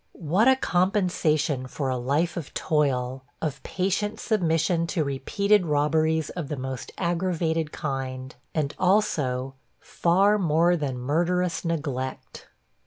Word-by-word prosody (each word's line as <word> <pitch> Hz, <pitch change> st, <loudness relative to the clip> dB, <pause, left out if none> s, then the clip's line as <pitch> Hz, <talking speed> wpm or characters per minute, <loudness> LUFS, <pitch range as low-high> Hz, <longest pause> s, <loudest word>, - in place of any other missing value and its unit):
What 180 Hz, -, +2 dB
a 265 Hz, -, +7 dB
compensation 175 Hz, -, +1 dB
for 135 Hz, +1 st, -3 dB
a 130 Hz, -, 0 dB
life 140 Hz, +8 st, 0 dB
of 165 Hz, -6 st, -6 dB
toil, 130 Hz, -4 st, 0 dB, 0.2 s
of 155 Hz, -4 st, -3 dB
patient 205 Hz, +3 st, -1 dB
submission 170 Hz, -4 st, +1 dB
to 165 Hz, -2 st, 0 dB
repeated 195 Hz, +8 st, +1 dB
robberies 155 Hz, +1 st, +1 dB
of 170 Hz, -5 st, -5 dB
the 150 Hz, -, -4 dB
most 130 Hz, -1 st, -5 dB
aggravated 170 Hz, -3 st, 0 dB
kind, 130 Hz, -2 st, -4 dB, 0.2 s
and, 150 Hz, -2 st, 0 dB
also, 145 Hz, -10 st, +1 dB, 0.3 s
far 195 Hz, +5 st, +2 dB
more 170 Hz, 0 st, +3 dB
than 140 Hz, -6 st, -2 dB
murderous 170 Hz, +7 st, 0 dB
neglect!! 145 Hz, -6 st, -4 dB
160 Hz, 120 wpm, -25 LUFS, 140-180 Hz, 0.3 s, a